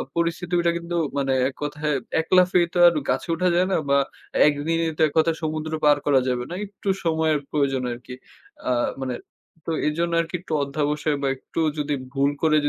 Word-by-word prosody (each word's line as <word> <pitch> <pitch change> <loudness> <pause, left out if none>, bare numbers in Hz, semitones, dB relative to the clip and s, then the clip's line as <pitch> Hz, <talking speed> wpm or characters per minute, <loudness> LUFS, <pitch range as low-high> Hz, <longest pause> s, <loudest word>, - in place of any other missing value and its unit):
পরিস্থিতি 170 +1 -1
ওইটা 170 0 +2
কিন্তু 170 0 -5 0.2
মানে 135 -1 +1 0.2
এককথায় 150 +1 -3 0.3
১ 160 - -12
লাফে 180 0 +5
তো - - -2
আর 170 - +5 0.2
গাছে 130 - 0
উঠা 180 +2 +1
যায় 180 +1 +3
না - - +3
বা 140 - +5 0.5
১ 150 - +4
দিনই 165 0 +1
তো - - -2
এককথায় 160 +2 +1
সমুদ্র 155 0 -3
পার 145 -1 +6
করা 140 -2 +4
যাবে 125 -1 0
না। 175 - -6
একটু 200 0 -6 0.2
সময়ের 160 -2 +2
প্রয়োজন 140 -3 0
আরকি। 125 +1 -8 0.6
আ - - +2 0.3
মানে 130 -2 -2 0.5
তো - - -2 0.2
এজন্য 170 +3 -1
আরকি 165 +1 -5
একটু 165 - -6
অধ্যাবসায় 150 +1 -1
বা 140 - 0
একটু 150 - -7 0.2
যদি 150 0 -1 0.2
ভুল 140 0 +2
করে 155 -1 +3
155 Hz, 185 wpm, -23 LUFS, 140-170 Hz, 0.6 s, পার